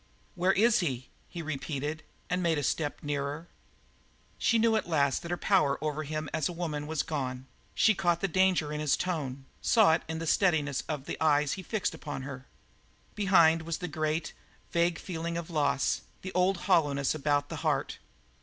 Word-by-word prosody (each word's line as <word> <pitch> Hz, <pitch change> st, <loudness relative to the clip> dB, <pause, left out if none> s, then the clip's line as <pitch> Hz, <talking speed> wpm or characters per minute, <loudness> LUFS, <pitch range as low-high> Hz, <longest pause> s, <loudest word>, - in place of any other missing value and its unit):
"Where 185 Hz, +2 st, +2 dB
is 230 Hz, +3 st, +4 dB
he?" 130 Hz, -, -2 dB, 0.2 s
he 170 Hz, -2 st, -6 dB
repeated, 150 Hz, 0 st, -3 dB, 0.3 s
and 180 Hz, +1 st, -1 dB
made 165 Hz, -3 st, +2 dB
a 145 Hz, -, -1 dB
step 145 Hz, +1 st, -1 dB
nearer. 145 Hz, +2 st, -3 dB, 0.9 s
She 230 Hz, -, +3 dB
knew 225 Hz, 0 st, +3 dB
at 215 Hz, -, -1 dB
last 140 Hz, -4 st, +2 dB
that 170 Hz, -, -7 dB
her 175 Hz, -, -1 dB
power 175 Hz, -9 st, +2 dB
over 155 Hz, 0 st, -2 dB
him 155 Hz, +1 st, -3 dB
as 160 Hz, -1 st, 0 dB
a -, -, -5 dB
woman 155 Hz, -4 st, -3 dB
was 155 Hz, -1 st, -1 dB
gone; 130 Hz, -5 st, -3 dB, 0.3 s
she 220 Hz, -, +5 dB
caught 175 Hz, -3 st, +1 dB
the 195 Hz, -, 0 dB
danger 185 Hz, -4 st, +2 dB
of 150 Hz, -, -3 dB
his 150 Hz, -2 st, +2 dB
tone, 140 Hz, -7 st, -3 dB, 0.2 s
saw 220 Hz, -8 st, +5 dB
it 165 Hz, -, +1 dB
in 160 Hz, 0 st, -3 dB
the 165 Hz, -, -4 dB
steadiness 155 Hz, -6 st, +2 dB
of 145 Hz, -3 st, -3 dB
the -, -, -6 dB
eyes 150 Hz, -2 st, +3 dB
he 190 Hz, -, -5 dB
fixed 205 Hz, 0 st, -2 dB
upon 145 Hz, -4 st, -6 dB
her. 135 Hz, -1 st, -8 dB, 0.7 s
Behind 170 Hz, -6 st, +4 dB
was 165 Hz, 0 st, -4 dB
a -, -, -1 dB
great, 155 Hz, +1 st, -2 dB, 0.4 s
vague 170 Hz, 0 st, +2 dB
feeling 170 Hz, -1 st, -4 dB
of 170 Hz, 0 st, -6 dB
loss, 145 Hz, -3 st, +1 dB, 0.2 s
the 185 Hz, -, -5 dB
old 180 Hz, 0 st, +2 dB
hollowness 145 Hz, -7 st, +2 dB
about 145 Hz, -1 st, 0 dB
the -, -, -5 dB
heart. -, -, -1 dB
160 Hz, 185 wpm, -29 LUFS, 145-175 Hz, 0.9 s, she